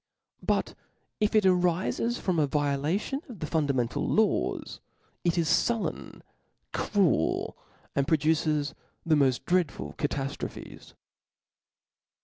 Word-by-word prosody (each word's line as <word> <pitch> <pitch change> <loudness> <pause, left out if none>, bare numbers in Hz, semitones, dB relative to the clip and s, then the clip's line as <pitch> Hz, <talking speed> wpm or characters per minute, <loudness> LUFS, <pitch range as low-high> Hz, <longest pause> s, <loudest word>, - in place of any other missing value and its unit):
But - - 0 0.5
if 215 0 +1
it 215 - +5
ariles 185 +6 +2
from 180 -4 0
a 150 - +3
violation 150 - 0
of 235 - -8
the - - -3
fundamental 140 -7 0
law.s 220 0 0 0.4
it 170 0 +1
is 165 -2 +2 0.2
fullen, 235 -2 -3 0.5
cruel, 185 - +1 0.4
and 140 0 +1
pro 160 - +4
duces 150 -1 +1 0.3
the 160 -2 +4
moil 135 -3 +4
dreadful 175 -4 0
cataftrophes. 140 -1 -4
160 Hz, 110 wpm, -28 LUFS, 145-190 Hz, 0.5 s, it